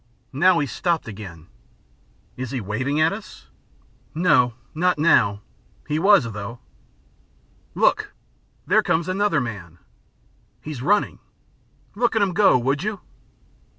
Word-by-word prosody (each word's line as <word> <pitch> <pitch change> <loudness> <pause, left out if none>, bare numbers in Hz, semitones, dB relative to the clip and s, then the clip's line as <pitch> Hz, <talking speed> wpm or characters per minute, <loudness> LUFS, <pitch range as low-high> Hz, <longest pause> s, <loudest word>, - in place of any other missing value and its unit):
Now 175 +6 +4
he's 145 -5 -1
stopped 170 -6 -1
again." 95 -7 -9 0.9
"Is 130 -1 -5
he 130 - -3
waving 130 +8 -2
at 160 +4 +3
us?" 210 +1 -11 0.7
"No, 125 -8 +3 0.2
not 180 +1 +1
now! 115 -10 +3 0.5
he 150 +1 -1
was, 195 -2 +5
though." 105 +3 -7 1.2
"Look! - - +2 0.5
There - - +3
comes 165 0 0
another 185 -3 +1
man!" 100 - -6 0.8
"He's 150 -5 -7
running." 205 +9 +1 0.7
"Look 235 +1 0
at 220 - +2
him 190 -2 0
go, 200 -8 +5
would 135 +4 -1
you." 210 -1 -4
150 Hz, 120 wpm, -22 LUFS, 120-185 Hz, 1.2 s, was